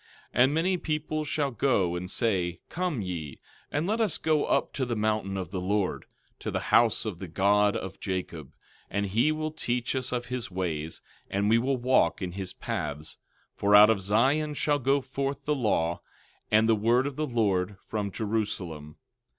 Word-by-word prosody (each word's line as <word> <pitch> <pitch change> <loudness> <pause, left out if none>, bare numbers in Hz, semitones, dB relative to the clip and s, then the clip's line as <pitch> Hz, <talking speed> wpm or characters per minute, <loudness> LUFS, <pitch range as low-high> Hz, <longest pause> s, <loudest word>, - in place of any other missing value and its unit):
12:3 125 - +5
And 135 +3 +3
many 180 +3 +2
people 155 -1 -2
shall 145 -2 -1
go 100 -9 +1
and 90 +1 -4
say, 90 -8 0
Come 170 - -2
ye, 85 -6 -5 0.3
and 150 +3 0
let 220 +4 0
us 215 -6 +2
go 155 -2 +1
up - - 0
to 135 - -2
the 120 -2 -1
mountain 105 -2 -1
of 90 -3 -5
the 95 -2 -3
Lord, 100 +1 -1 0.3
to - - -4
the - - -1
house 115 -1 +4
of 100 -6 -4
the 95 - -6
God 100 +4 +3
of 95 0 -7
Jacob; 90 -7 -4 0.4
and 100 +1 -1
he 115 +10 +2
will 155 0 -2
teach 125 -4 -2
us 130 -1 -2
of 120 -1 -2
his 125 -2 -4
ways, 80 -4 -3 0.3
and 100 +2 +1
we 115 - +5
will 130 +2 0
walk 130 +2 +2
in 90 -2 -3
his 95 0 -5
paths; 75 +1 -5 0.4
for 100 +1 +3
out 105 +2 +9
of 105 -3 0
Zion 135 +10 +2
shall 145 0 +1
go 135 +2 +2
forth 135 +1 -4
the 150 - +2
law, 90 - 0 0.5
and 110 +1 +4
the 115 - +5
word 115 +5 +2
of 140 -1 -3
the 155 +1 -2
Lord 105 -5 0
from 105 -2 -2
Jerusalem. 95 -9 -3
110 Hz, 190 wpm, -28 LUFS, 95-135 Hz, 0.5 s, out